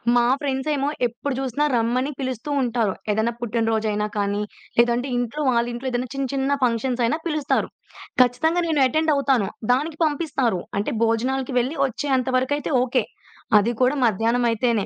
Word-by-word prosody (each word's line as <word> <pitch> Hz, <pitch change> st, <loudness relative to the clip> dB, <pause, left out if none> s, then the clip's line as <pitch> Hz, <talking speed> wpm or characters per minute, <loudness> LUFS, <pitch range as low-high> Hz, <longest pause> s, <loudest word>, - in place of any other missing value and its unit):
మా 240 Hz, -, +4 dB, 0.2 s
ఫ్రెండ్సేమో 280 Hz, +1 st, -1 dB, 0.2 s
ఎప్పుడు 240 Hz, +4 st, -4 dB
జూసినా 270 Hz, +2 st, 0 dB
రమ్మని 245 Hz, +4 st, 0 dB
పిలుస్తూ 260 Hz, 0 st, -4 dB
ఉంటారు. 230 Hz, -5 st, 0 dB, 0.2 s
ఏదైనా 220 Hz, +3 st, 0 dB
పుట్టిన 235 Hz, -1 st, -1 dB
రోజైనా 210 Hz, -1 st, 0 dB
కానీ, 205 Hz, 0 st, 0 dB, 0.4 s
లేదంటే 240 Hz, +2 st, +3 dB
ఇంట్లో 245 Hz, +5 st, -2 dB
వాళ్ళింట్లో 240 Hz, +1 st, -1 dB
ఏదైనా 245 Hz, +1 st, -2 dB
చిన్న 275 Hz, -1 st, -2 dB
చిన్న 275 Hz, +1 st, +1 dB
ఫంక్షన్సయినా 245 Hz, +2 st, +1 dB
పిలుస్తారు. 305 Hz, -3 st, 0 dB, 0.5 s
ఖచ్చితంగా 315 Hz, +8 st, +2 dB
నేను 310 Hz, -4 st, +1 dB
అటెండ్ 315 Hz, +5 st, +1 dB
అవుతాను. 270 Hz, -7 st, +2 dB, 0.2 s
దానికి 295 Hz, +5 st, 0 dB
పంపిస్తారు. 275 Hz, -, 0 dB, 0.2 s
అంటే 205 Hz, -, -2 dB
భోజనాలకి 255 Hz, +4 st, 0 dB
వెళ్ళి 260 Hz, +6 st, -2 dB
ఒచ్చే 270 Hz, +4 st, -4 dB
అంత 255 Hz, 0 st, -2 dB
వరకైతే 285 Hz, +4 st, -1 dB
ఓకె. 255 Hz, -1 st, +1 dB, 0.6 s
అది 215 Hz, +3 st, +1 dB
కూడా 255 Hz, +3 st, +3 dB
మధ్యాహ్నమైతేనే, 230 Hz, 0 st, +1 dB
250 Hz, 140 wpm, -23 LUFS, 230-275 Hz, 0.6 s, మా